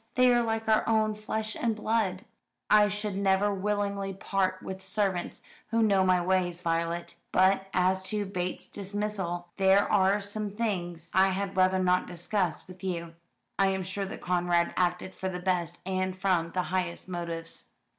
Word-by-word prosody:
They 250 Hz, -1 st, +5 dB
are 240 Hz, -, +4 dB
like 225 Hz, -1 st, -1 dB
our 220 Hz, 0 st, +4 dB
own 215 Hz, -1 st, +3 dB
flesh 215 Hz, +1 st, -3 dB
and 230 Hz, -2 st, 0 dB
blood." 215 Hz, -3 st, 0 dB, 0.5 s
"I 210 Hz, -1 st, +7 dB
should 205 Hz, -1 st, -3 dB
never 200 Hz, +1 st, +2 dB
willingly 200 Hz, 0 st, -1 dB
part 190 Hz, -1 st, -1 dB
with 190 Hz, 0 st, -6 dB
servants 190 Hz, -2 st, -1 dB, 0.3 s
who 230 Hz, +1 st, +2 dB
know 200 Hz, -3 st, +4 dB
my 185 Hz, -1 st, +4 dB
ways, 180 Hz, -1 st, 0 dB
Violet. 170 Hz, +1 st, -1 dB
But 190 Hz, +1 st, +3 dB
as 185 Hz, +1 st, +2 dB
to 210 Hz, 0 st, -1 dB
Bates's 180 Hz, -2 st, -4 dB
dismissal 200 Hz, -3 st, -3 dB
there 195 Hz, +1 st, +4 dB
are 195 Hz, 0 st, +4 dB
some 205 Hz, +1 st, -4 dB
things 185 Hz, -6 st, -3 dB
I 190 Hz, +1 st, +5 dB
had 195 Hz, 0 st, -2 dB
rather 185 Hz, 0 st, +4 dB
not 180 Hz, -1 st, +2 dB
discuss 175 Hz, +1 st, -2 dB
with 185 Hz, +1 st, -13 dB
you 170 Hz, -3 st, -3 dB, 0.5 s
I 195 Hz, -, +5 dB
am 190 Hz, -1 st, 0 dB
sure 195 Hz, +2 st, -3 dB
that -, -, -8 dB
Conrad 175 Hz, -1 st, +1 dB
acted 180 Hz, +1 st, 0 dB
for 190 Hz, -, -3 dB
the 180 Hz, -1 st, -4 dB
best, 180 Hz, -3 st, -1 dB
and 185 Hz, 0 st, -1 dB
from 185 Hz, -3 st, +1 dB
the 180 Hz, -, 0 dB
highest 180 Hz, -2 st, -2 dB
motives." 170 Hz, -2 st, -5 dB
190 Hz, 165 wpm, -29 LUFS, 180-205 Hz, 0.5 s, I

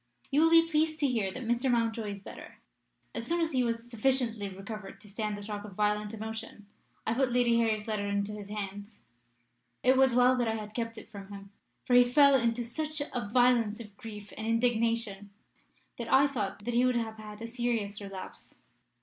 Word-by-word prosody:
You 285 Hz, +3 st, +4 dB
will 325 Hz, -, +6 dB
be 330 Hz, 0 st, +6 dB
pleased 315 Hz, 0 st, +1 dB
to 285 Hz, -, +4 dB
hear 220 Hz, -7 st, 0 dB
that 255 Hz, +4 st, -7 dB
Mr. 240 Hz, +3 st, +1 dB
Mountjoy 230 Hz, -2 st, +1 dB
is 200 Hz, -1 st, -7 dB
better. -, -, -11 dB, 0.6 s
As 230 Hz, 0 st, -5 dB
soon 340 Hz, +1 st, +1 dB
as 330 Hz, -1 st, +1 dB
he 255 Hz, -3 st, +2 dB
was 230 Hz, 0 st, -2 dB
sufficiently 230 Hz, -3 st, 0 dB
recovered 195 Hz, +1 st, -8 dB
to -, -, -15 dB
stand 210 Hz, 0 st, -3 dB
the 205 Hz, -, -8 dB
shock 205 Hz, 0 st, -5 dB
of 210 Hz, -2 st, -9 dB
violent 210 Hz, 0 st, 0 dB
emotion, 220 Hz, -1 st, -7 dB, 0.4 s
I 225 Hz, -, +1 dB
put 260 Hz, +1 st, +1 dB
Lady 240 Hz, -1 st, +3 dB
Harry's 220 Hz, -2 st, 0 dB
letter 210 Hz, -2 st, -1 dB
into 200 Hz, 0 st, -1 dB
his 205 Hz, -1 st, -8 dB
hands. 205 Hz, 0 st, -6 dB, 0.8 s
It 260 Hz, +1 st, +5 dB
was 265 Hz, -2 st, +4 dB
well 250 Hz, +1 st, +5 dB
that 240 Hz, -2 st, +1 dB
I 220 Hz, -, 0 dB
had 210 Hz, -1 st, -6 dB
kept 230 Hz, 0 st, -3 dB
it 220 Hz, -, -10 dB
from 200 Hz, -2 st, -9 dB
him, 200 Hz, 0 st, -10 dB, 0.3 s
for 250 Hz, -, 0 dB
he 245 Hz, -, +9 dB
fell 280 Hz, +3 st, +5 dB
into 235 Hz, -2 st, +2 dB
such 305 Hz, +5 st, -3 dB
a 245 Hz, -7 st, -4 dB
violence 240 Hz, -3 st, +3 dB
of 210 Hz, -3 st, -10 dB
grief 210 Hz, -1 st, -9 dB
and 220 Hz, -, -5 dB
indignation 230 Hz, -3 st, 0 dB, 0.7 s
that 235 Hz, -, -4 dB
I 275 Hz, +1 st, +6 dB
thought 210 Hz, -6 st, -4 dB
he 240 Hz, +1 st, +2 dB
would 255 Hz, -1 st, +3 dB
have 225 Hz, -2 st, -2 dB
had 210 Hz, -1 st, -9 dB
a -, -, -4 dB
serious 230 Hz, -4 st, -2 dB
relapse. 195 Hz, -2 st, -9 dB
230 Hz, 200 wpm, -30 LUFS, 210-245 Hz, 0.8 s, he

